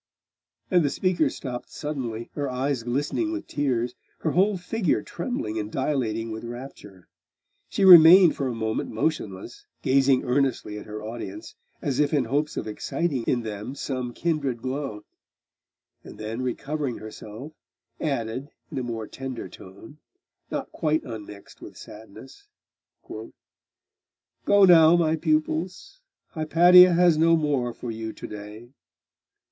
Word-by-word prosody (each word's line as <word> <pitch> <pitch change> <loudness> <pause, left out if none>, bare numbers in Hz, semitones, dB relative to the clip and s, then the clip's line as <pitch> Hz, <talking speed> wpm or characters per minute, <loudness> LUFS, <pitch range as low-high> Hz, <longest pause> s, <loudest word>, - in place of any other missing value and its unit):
And 180 -3 +4
the 145 - +1
speaker 185 +4 +1
stopped 125 -3 -7
suddenly, 125 -7 -5
her 145 -1 -3
eyes 130 0 -1
glistening 145 - -1
with 325 -1 -4
tears, 125 -4 -1 0.3
her 155 - 0
whole 195 +4 +2
figure 180 0 -1
trembling 110 - -4
and 105 0 -5
dilating 115 -5 -1
with 110 +1 -6
rapture. 120 -6 -10 0.6
She 195 - +1
remained 175 0 +9
for 135 - -2
a 125 - -3
moment 110 -1 -2
motionless, 110 -5 -4 0.2
gazing 135 -1 +3
earnestly 125 -5 -1
at - - -12
her 105 0 -7
audience, 120 - -7 0.3
as 140 -4 -1
if 150 0 +2
in 135 -4 +1
hopes 145 +6 -1
of - - -3
exciting 135 +6 -2
in 120 -2 0
them 110 +4 -6
some 130 -3 -4
kindred 140 -4 -2
glow; 130 -5 -4 1.0
and - - -12
then 110 +3 -5
recovering 135 +1 -3
herself, 110 +6 -10 0.5
added 130 -2 -3 0.2
in - - -3
a - - -3
more 115 -2 -4
tender 130 +1 -7
tone, 105 +10 -14 0.5
not - - -4
quite 155 -1 0
unmixed 105 -5 -10
with - - -11
sadness 110 - -13 0.6
'Go - - -8 1.3
now, 165 -2 +7
my 160 -2 +2
pupils. 160 - -2 0.3
Hypatia 175 +3 +6
has 170 -2 +4
no 165 +1 +5
more 140 -6 0
for 120 0 -7
you 110 0 -5
to - - -10
day. 105 +3 -9
135 Hz, 135 wpm, -25 LUFS, 115-155 Hz, 1.3 s, remained